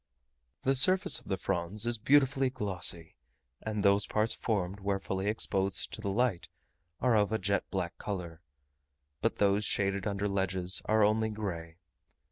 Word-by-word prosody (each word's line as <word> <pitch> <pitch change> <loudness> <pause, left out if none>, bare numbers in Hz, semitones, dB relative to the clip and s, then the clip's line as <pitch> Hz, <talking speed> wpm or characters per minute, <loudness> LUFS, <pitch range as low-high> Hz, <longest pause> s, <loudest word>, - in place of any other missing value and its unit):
The 135 - +2
surface 185 +8 +5
of - - -19
the 95 - -1
fronds 95 +4 -1
is 120 -1 -1
beautifully 135 +2 +3
glossy; 95 -8 -1 0.4
and 105 -2 -3
those 100 0 +3
parts 110 +1 +1
formed 100 -4 -2
where 100 0 -1
fully 95 0 -4
exposed 100 -2 -1
to - - -6
the 100 - -3
light 105 -3 0 0.5
are 125 -2 +3
of 105 -1 +2
a 110 - +1
jet 100 0 -1
black 90 -3 -3
colour, 90 -5 -6 0.8
but - - 0
those 100 0 +2
shaded 100 -1 0
under 100 0 -1
ledges 95 -2 0
are 110 0 +3
only 110 +1 +2
grey. 85 -7 -6
100 Hz, 155 wpm, -30 LUFS, 95-110 Hz, 0.8 s, surface